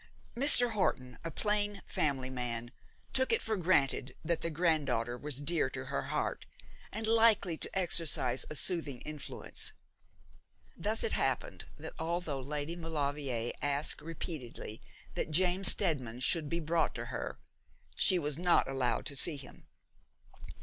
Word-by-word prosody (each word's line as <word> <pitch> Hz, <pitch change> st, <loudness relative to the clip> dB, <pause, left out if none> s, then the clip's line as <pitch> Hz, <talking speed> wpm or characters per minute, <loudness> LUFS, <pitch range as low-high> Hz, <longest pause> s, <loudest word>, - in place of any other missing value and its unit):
Mr. 245 Hz, -2 st, +10 dB
Horton, 130 Hz, -, -2 dB
a 165 Hz, -, -4 dB
plain 205 Hz, +3 st, -1 dB
family 130 Hz, -3 st, -1 dB
man, 120 Hz, -2 st, -3 dB, 0.4 s
took 260 Hz, 0 st, +1 dB
it 455 Hz, -, +3 dB
for 220 Hz, -, -1 dB
granted 150 Hz, -8 st, +1 dB
that 170 Hz, 0 st, -1 dB
the 165 Hz, -, -2 dB
granddaughter 150 Hz, -8 st, 0 dB
was 145 Hz, +1 st, -5 dB
dear 170 Hz, +3 st, +1 dB
to -, -, -7 dB
her -, -, -3 dB
heart, -, -, -3 dB, 0.4 s
and 220 Hz, -, -4 dB
likely 220 Hz, -6 st, +4 dB
to -, -, -1 dB
exercise 165 Hz, -8 st, +2 dB
a 155 Hz, -, -7 dB
soothing 150 Hz, -6 st, 0 dB
influence. 150 Hz, -1 st, -5 dB, 1.0 s
Thus 210 Hz, +6 st, -2 dB
it 460 Hz, -, +1 dB
happened -, -, -2 dB
that -, -, -9 dB
although 165 Hz, -4 st, -3 dB
Lady 150 Hz, +4 st, -4 dB
Maulevrier 145 Hz, -7 st, -3 dB
asked 145 Hz, +1 st, -1 dB
repeatedly 150 Hz, -, -7 dB, 0.3 s
that -, -, -3 dB
James 185 Hz, +4 st, +3 dB
Steadman 130 Hz, -, 0 dB
should 155 Hz, +2 st, +2 dB
be 170 Hz, -, -2 dB
brought 165 Hz, 0 st, 0 dB
to -, -, -5 dB
her, -, -, -5 dB, 0.6 s
she 185 Hz, -, +3 dB
was 150 Hz, -2 st, -2 dB
not 175 Hz, -1 st, +3 dB
allowed 135 Hz, -3 st, -1 dB
to 145 Hz, -, -3 dB
see 145 Hz, +3 st, +3 dB
him. 135 Hz, -, -14 dB
155 Hz, 145 wpm, -32 LUFS, 135-180 Hz, 1.0 s, Mr